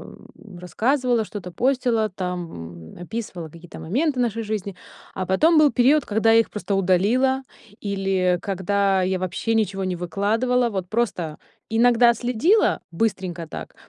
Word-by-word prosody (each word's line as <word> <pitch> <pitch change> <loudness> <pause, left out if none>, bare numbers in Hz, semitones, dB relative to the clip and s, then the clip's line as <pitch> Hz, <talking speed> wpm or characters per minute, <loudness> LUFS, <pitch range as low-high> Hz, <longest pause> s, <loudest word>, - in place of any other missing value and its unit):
э, 195 -4 -15
рассказывала, 240 - 0
что-то 190 -4 -8
постила, 240 0 +1
там, 165 - -7
м, 175 - -9
описывала 180 -5 -6
какие-то 170 +2 -13
моменты 260 - -1
нашей 230 -2 0
жизни. 205 -3 -4 0.4
А 190 - -3
потом 315 - +4
был 300 -2 +5
период, 275 +5 +3
когда 220 +2 +2
я 225 - +6
их 230 - +1
просто 210 -1 -4
удалила 220 +9 +2 0.4
или 195 -3 0
когда 195 0 0
я 185 0 0
вообще 185 +5 -2
ничего 200 -3 0
не 185 -1 -2
выкладывала. 225 +8 0
Вот 190 -3 -4
просто 185 -9 -2 0.3
иногда 235 +1 +4
следила 250 - +2
быстренько 180 -3 -2
так, - - -8
205 Hz, 145 wpm, -23 LUFS, 180-240 Hz, 0.4 s, я